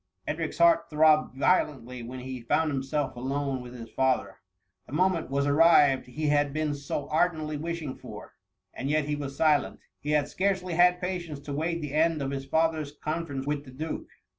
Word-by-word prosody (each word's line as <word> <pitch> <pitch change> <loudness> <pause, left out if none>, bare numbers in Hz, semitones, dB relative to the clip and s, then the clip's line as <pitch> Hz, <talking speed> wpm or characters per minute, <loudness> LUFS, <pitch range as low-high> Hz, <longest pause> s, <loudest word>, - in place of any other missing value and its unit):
Edric's - - -3
heart 335 -1 +4
throbbed 155 -3 +3
violently 135 -6 +1
when 125 +2 -7
he 130 -1 -6
found 155 +7 +1
himself 135 +1 -2
alone 135 +1 -2
with 125 0 -10
his 115 -2 -9
father; 130 -1 0 0.5
the - - -11
mo 180 +5 +4
ment 165 -7 -3
was 140 +1 0
arrived 145 -3 +5
he 150 +4 -2
had 145 -1 +2
been 155 0 -1
so 145 0 -4
ardently 155 -2 +1
wish 165 +2 -4
ing 135 -3 -5
for, - - -10 0.4
and 135 - -4
yet 155 0 +2
he 150 0 -1
was 140 -2 -6
sileiit. 150 -3 +2 0.2
He 145 - -6
had 145 -1 +2
scarcely 185 -1 -1
had 180 +1 +4
patience 175 -5 -4
to 145 0 -6
wait 165 +3 -1
the 150 -2 -5
end 160 +1 +2
of 135 -1 -2
his 135 0 -5
father's 160 -1 0
con 160 +3 -3
ference 135 -2 -4
with 145 0 -2
the 135 - -13
duke 155 +5 -5
150 Hz, 195 wpm, -28 LUFS, 135-160 Hz, 0.5 s, arrived